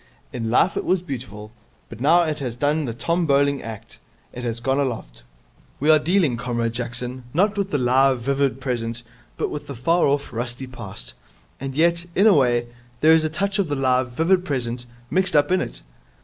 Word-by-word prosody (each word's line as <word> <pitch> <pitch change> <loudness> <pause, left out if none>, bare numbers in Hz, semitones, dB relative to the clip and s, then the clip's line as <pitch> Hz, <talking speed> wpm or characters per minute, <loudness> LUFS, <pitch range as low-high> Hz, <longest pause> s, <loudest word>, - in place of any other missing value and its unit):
In 115 -2 -3
life 150 +10 +3
it - - -1
was 185 -1 +1
beautiful, 115 - -7 0.4
but 115 0 -11
now 170 +5 +5
it 155 -2 -2
has 125 -4 -4
done 145 +4 0
the 115 - -3
Tom 170 +7 0
Bowling 140 -1 +2
act. 110 -2 -9 0.3
It 125 - -7
has 115 -1 -2
gone 135 +3 0
aloft. 115 - -3 0.6
We 150 +3 +4
are 155 - +6
dealing, 160 -5 +2
Comrade 120 -1 -2
Jackson, 125 +1 -3
not 200 +4 +3
with 200 -1 -1
the 145 - 0
live, 130 +1 +3
vivid 135 +1 0
present, 120 -3 -3 0.3
but - - -2
with 145 -1 -6
the 140 - -6
far 165 +9 +2
off, 140 -1 -1
rusty 120 +2 -3
past. 110 - -8 0.5
And 135 0 -5
yet, 170 +2 +3
in 200 - +4
a 220 - +7
way, 120 -5 +3 0.4
there 155 - +6
is 160 0 +5
a 155 - 0
touch 195 +5 -1
of 195 - +1
the 145 - -1
live, 130 -2 +1
vivid 175 +7 +2
present 125 -5 -3 0.2
mixed 190 -2 +1
up 145 +2 +4
in 185 - +3
it.' - - -6
135 Hz, 200 wpm, -22 LUFS, 120-160 Hz, 0.6 s, a